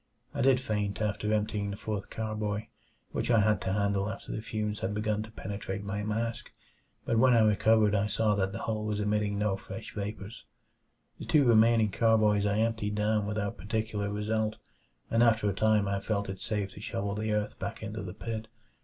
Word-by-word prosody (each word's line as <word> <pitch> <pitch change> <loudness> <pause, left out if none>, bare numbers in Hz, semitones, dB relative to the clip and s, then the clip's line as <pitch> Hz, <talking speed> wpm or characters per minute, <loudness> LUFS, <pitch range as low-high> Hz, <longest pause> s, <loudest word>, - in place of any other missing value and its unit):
I 140 - -2
did 130 -1 +5
faint 105 -6 -2
after 105 0 -1
emptying 105 -1 0
the 100 - -5
fourth 105 -2 -4
carboy, 110 -1 -3 0.4
which - - -2
I 115 -2 +5
had 105 -1 +2
to 95 - -1
handle 100 0 +1
after - - -7
the 110 - -3
fumes 105 -1 -3
had 100 +2 -2
begun 105 0 0
to 110 - -7
penetrate 100 -2 -5
my 100 +1 -3
mask; 110 +2 -2 0.6
but 115 - +2
when 130 0 +6
I 115 - +6
recovered 110 0 +4
I 105 0 +2
saw 105 +1 +2
that 95 -2 0
the 100 - -5
hole 110 -1 -2
was 105 -1 -1
emitting 105 0 0
no 105 -1 +1
fresh 110 - -8
vapors. 105 +1 -6 0.8
The - - -6
two 145 -3 +4
remaining 115 -2 +5
carboys 105 -2 +3
I 105 0 +1
emptied 110 -2 0
down 105 0 +1
without 105 -3 -2
particular 105 +1 -2
result, 110 +1 -1 0.6
and 115 - +3
after 115 -2 +4
a 100 - +1
time 110 0 +3
I 100 0 0
felt 100 -1 -2
it 95 - -5
safe 105 -3 -2
to - - -11
shovel 100 -1 -2
the 110 +1 -2
earth 105 0 -1
back 100 +3 -5
into 110 +1 -4
the 95 0 -7
pit. 110 0 -5
105 Hz, 200 wpm, -30 LUFS, 100-110 Hz, 0.8 s, when